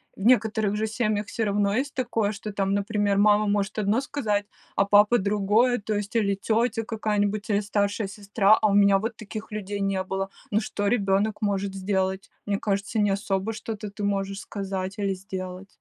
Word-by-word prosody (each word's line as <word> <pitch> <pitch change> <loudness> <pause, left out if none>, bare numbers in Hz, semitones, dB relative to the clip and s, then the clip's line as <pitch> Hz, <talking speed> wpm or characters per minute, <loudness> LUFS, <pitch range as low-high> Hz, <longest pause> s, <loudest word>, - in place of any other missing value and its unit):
В - - -12
некоторых 220 -4 +3
же 220 +1 0
семьях 215 -2 -1
всё 225 +1 -2
равно 200 0 +1
есть 275 +1 -2
такое, 225 -5 0
что, 210 0 -6
там, 195 0 0
например, 205 -1 +1
мама 210 0 +5
может 205 +1 0
одно 215 +5 +2
сказать, 215 -8 -1 0.3
а 195 - +4
папа 205 +4 +5
другое, 210 +5 +2
то 210 +1 -3
есть, 205 +2 -3
или 200 -3 +2
тётя 225 +3 0
какая-нибудь, 215 -1 -1
или 205 0 +3
старшая 205 0 -1
сестра, 205 +1 +3
а 215 - +4
у 200 - +1
меня 200 -1 +6
вот 225 +3 -3
таких 215 0 -8
людей 205 -1 -4
не 195 -1 0
было. 195 +1 -3 0.2
Ну, 210 - +3
что 205 -2 -2
ребёнок 205 -1 +1
может 200 -1 -1
сделать? 190 0 -1 0.2
Мне 200 -1 0
кажется, 200 +2 -1
не 205 -1 +3
особо 195 +2 -1
что-то 215 -1 -6
ты 205 - -7
можешь 195 -1 -1
сказать 195 0 -4
или 200 -1 0
сделать. 185 0 -7
205 Hz, 185 wpm, -25 LUFS, 195-215 Hz, 0.3 s, меня